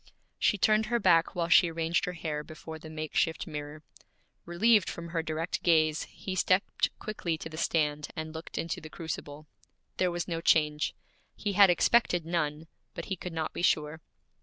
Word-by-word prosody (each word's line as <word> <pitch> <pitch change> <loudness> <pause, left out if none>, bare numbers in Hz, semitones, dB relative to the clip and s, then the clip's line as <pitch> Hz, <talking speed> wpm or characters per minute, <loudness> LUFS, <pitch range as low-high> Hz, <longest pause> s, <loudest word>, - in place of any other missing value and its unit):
She 210 - +3
turned 215 +2 +3
her 240 +2 +1
back 170 -5 +3
while 170 -1 0
she 170 +1 +6
arranged 165 +2 0
her 180 - -4
hair 155 -3 -4
before 160 +1 -9
the 155 - -10
makeshift 155 +1 -1
mirror. 150 +1 -7 0.6
Relieved 205 +3 +3
from 170 0 -7
her 165 -1 -1
direct 160 +2 -3
gaze, 155 -2 +3
he 190 - -7
stepped 185 +1 +2
quickly 175 -6 -3
to 160 - -7
the 155 - -9
stand, 150 -3 0
and 160 -1 -5
looked 160 +1 -8
into 165 0 -3
the 155 - -9
crucible. 155 -2 -6 0.5
There 185 - +2
was 175 0 -3
no 165 -2 -3
change. 150 -2 +2 0.4
He 205 -1 -3
had 200 0 +7
expected 175 -1 +3
none, 160 -2 -2 0.3
but - - -5
he - - -1
could 180 0 -7
not 160 -1 -3
be - - -4
sure. 155 -2 +1
165 Hz, 180 wpm, -29 LUFS, 155-175 Hz, 0.6 s, had